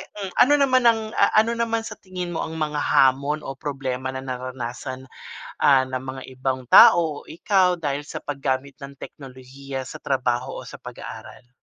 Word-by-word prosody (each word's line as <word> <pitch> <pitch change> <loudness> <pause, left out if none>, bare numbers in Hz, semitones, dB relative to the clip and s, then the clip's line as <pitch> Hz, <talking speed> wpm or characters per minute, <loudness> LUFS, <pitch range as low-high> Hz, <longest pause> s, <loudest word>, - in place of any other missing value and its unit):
mm. 195 -3 -5
Ano 290 +3 +6
naman 260 -3 +3
ang, 220 -1 +2
ah, - - +4
ano 220 +2 +4
naman 230 -1 -1
sa 215 -1 -8
tingin 180 -2 -6
mo 165 - -3
ang 160 - -7
mga 150 -2 -2
hamon 140 +2 +2
o - - -5
problema 130 -2 -4
na 130 - -5
naranasan, 130 0 -6 0.6
ah, 135 -2 +5
ng 130 0 -4
mga 130 0 -7
ibang 130 -1 -3
tao 160 -4 +6
o - - -25
ikaw 180 +1 +2
dahil 145 -1 -2
sa - - -7
paggamit 140 -1 -3
ng 140 0 -8
teknolohiya 135 0 -8
sa - - -8
trabaho 125 -1 -1
o - - -11
sa - - -9
pag-aaral? 120 - -10
140 Hz, 175 wpm, -23 LUFS, 130-175 Hz, 0.6 s, Ano